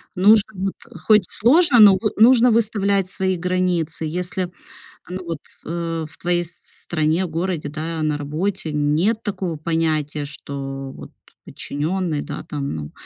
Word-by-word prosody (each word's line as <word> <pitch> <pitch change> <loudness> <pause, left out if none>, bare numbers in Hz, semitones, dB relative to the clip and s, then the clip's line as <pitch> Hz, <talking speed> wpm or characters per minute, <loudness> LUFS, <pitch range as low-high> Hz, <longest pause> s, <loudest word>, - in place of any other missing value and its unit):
Нужно 210 +3 +5
вот, 190 +1 -2 0.3
хоть 215 -3 +4
сложно, 270 +3 +4
но 200 -3 +9
вы 215 - 0
нужно 240 +2 +6
выставлять 200 -4 +1
свои 190 -1 -1
границы. 180 -3 -1
Если, 180 +2 -3 0.6
ну 185 0 -6
вот, 165 -2 -4 0.2
в - - -21
э 165 -1 -3
в - - -14
твоей 175 0 0
с 170 0 -11
стране, 160 +2 -1
городе, 165 -2 -3
да, 160 +2 -4
на 155 -1 0
работе 155 +4 -3
нет 155 +10 +1
такого 190 -5 -3
понятия, 155 -2 -1
что 135 -1 -6
вот - - -11 0.3
подчинённый, 160 +1 -3
да, - - -6
там, 140 - -4
ну, 75 -1 -6
175 Hz, 145 wpm, -21 LUFS, 155-195 Hz, 0.6 s, но